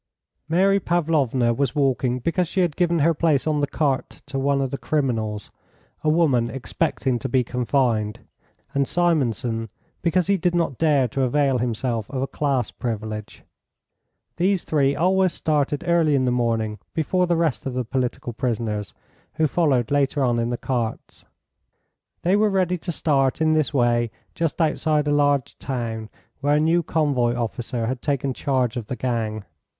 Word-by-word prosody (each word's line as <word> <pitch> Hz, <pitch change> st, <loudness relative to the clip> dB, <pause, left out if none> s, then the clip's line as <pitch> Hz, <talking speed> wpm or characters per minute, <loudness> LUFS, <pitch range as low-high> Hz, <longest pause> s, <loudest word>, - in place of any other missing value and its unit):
Mary 195 Hz, +4 st, +3 dB
Pavlovna 150 Hz, -9 st, +1 dB
was 130 Hz, 0 st, -1 dB
walking 130 Hz, -3 st, +1 dB
because 170 Hz, +7 st, 0 dB
she 190 Hz, -, 0 dB
had 170 Hz, -5 st, 0 dB
given 175 Hz, -1 st, +2 dB
her 165 Hz, +2 st, +3 dB
place 155 Hz, -3 st, +1 dB
on 155 Hz, -2 st, +1 dB
the 145 Hz, -, +1 dB
cart 140 Hz, -2 st, -2 dB
to 140 Hz, -1 st, -4 dB
one 140 Hz, +1 st, +1 dB
of 135 Hz, -2 st, -1 dB
the 140 Hz, -, -2 dB
criminals, 115 Hz, -8 st, -1 dB, 0.5 s
a 155 Hz, -, +2 dB
woman 140 Hz, -8 st, +3 dB
expecting 135 Hz, -1 st, -1 dB
to 135 Hz, -, -4 dB
be 130 Hz, 0 st, +2 dB
confined, 120 Hz, -3 st, 0 dB, 0.5 s
and 140 Hz, -1 st, +1 dB
Simonson 125 Hz, -, 0 dB, 0.3 s
because 175 Hz, +1 st, +2 dB
he 200 Hz, 0 st, +2 dB
did 175 Hz, 0 st, 0 dB
not 165 Hz, -7 st, 0 dB
dare 145 Hz, -5 st, +3 dB
to 135 Hz, -, -2 dB
avail 135 Hz, 0 st, +2 dB
himself 115 Hz, -2 st, -2 dB
of 130 Hz, -1 st, -2 dB
a -, -, -2 dB
class 135 Hz, -6 st, -1 dB
privilege. 110 Hz, -3 st, -5 dB, 0.9 s
These 185 Hz, +1 st, +1 dB
three 140 Hz, -2 st, +1 dB
always 185 Hz, +2 st, +2 dB
started 145 Hz, -2 st, 0 dB
early 165 Hz, -4 st, +3 dB
in 130 Hz, -1 st, +2 dB
the 125 Hz, -, +2 dB
morning 115 Hz, -3 st, 0 dB, 0.2 s
before 180 Hz, +3 st, +1 dB
the 170 Hz, -, +2 dB
rest 165 Hz, -5 st, 0 dB
of 130 Hz, -, -4 dB
the 125 Hz, -1 st, -1 dB
political 125 Hz, 0 st, -2 dB
prisoners, 110 Hz, -5 st, -2 dB, 0.4 s
who 160 Hz, -, +2 dB
followed 145 Hz, -7 st, +1 dB
later 140 Hz, 0 st, +2 dB
on 120 Hz, -2 st, +2 dB
in 115 Hz, 0 st, 0 dB
the 120 Hz, -, -2 dB
carts. 120 Hz, -4 st, -4 dB, 1.0 s
They 180 Hz, +3 st, +3 dB
were 210 Hz, +1 st, +3 dB
ready 185 Hz, -2 st, +1 dB
to 175 Hz, -, -4 dB
start 135 Hz, -5 st, +1 dB
in 160 Hz, 0 st, +3 dB
this 155 Hz, -2 st, +1 dB
way 120 Hz, -3 st, +2 dB, 0.2 s
just 165 Hz, 0 st, -2 dB
outside 155 Hz, -2 st, +1 dB
a -, -, +2 dB
large 145 Hz, -3 st, +1 dB
town, 115 Hz, -4 st, -4 dB, 0.3 s
where 145 Hz, +1 st, +2 dB
a -, -, +3 dB
new 165 Hz, +3 st, +3 dB
convoy 140 Hz, -7 st, +1 dB
officer 120 Hz, 0 st, -3 dB
had 125 Hz, +1 st, -3 dB
taken 140 Hz, -2 st, -1 dB
charge 130 Hz, -3 st, 0 dB
of 120 Hz, -4 st, -4 dB
the 125 Hz, -, -3 dB
gang. 110 Hz, -5 st, -2 dB
135 Hz, 170 wpm, -23 LUFS, 120-160 Hz, 1.0 s, Mary